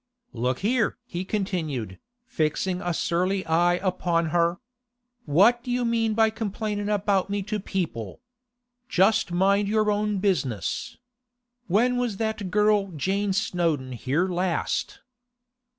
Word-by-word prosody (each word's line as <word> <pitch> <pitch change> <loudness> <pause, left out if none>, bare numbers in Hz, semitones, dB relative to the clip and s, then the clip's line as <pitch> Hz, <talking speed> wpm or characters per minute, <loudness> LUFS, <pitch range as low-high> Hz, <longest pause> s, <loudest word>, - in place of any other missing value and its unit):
'Look 125 +2 -1
here!' 225 +2 +1
he 180 -6 -4
continued, 160 - -3 0.3
fixing 180 - -1
a 175 - -1
surly 185 +3 0
eye 175 +2 +3
upon 175 -3 0
her. 170 +1 +2 0.7
'What 210 +11 +4
do 250 - -7
you 245 0 0
mean 225 -2 +1
by 220 -1 +4
complaining 210 -1 -3
about 200 -2 +1
me 200 0 -1
to 210 +1 -3
people? 170 - -4 0.7
Just 195 +1 +3
mind 200 +3 +2
your 215 0 +2
own 210 0 0
business. 155 - -1 0.7
When 240 +7 +2
was 240 -5 -1
that 220 -3 -2
girl 210 0 +3
Jane 195 +6 0
Snowdon 170 -9 0
here 135 +8 0
last? 180 -2 -2
195 Hz, 125 wpm, -25 LUFS, 170-210 Hz, 0.7 s, What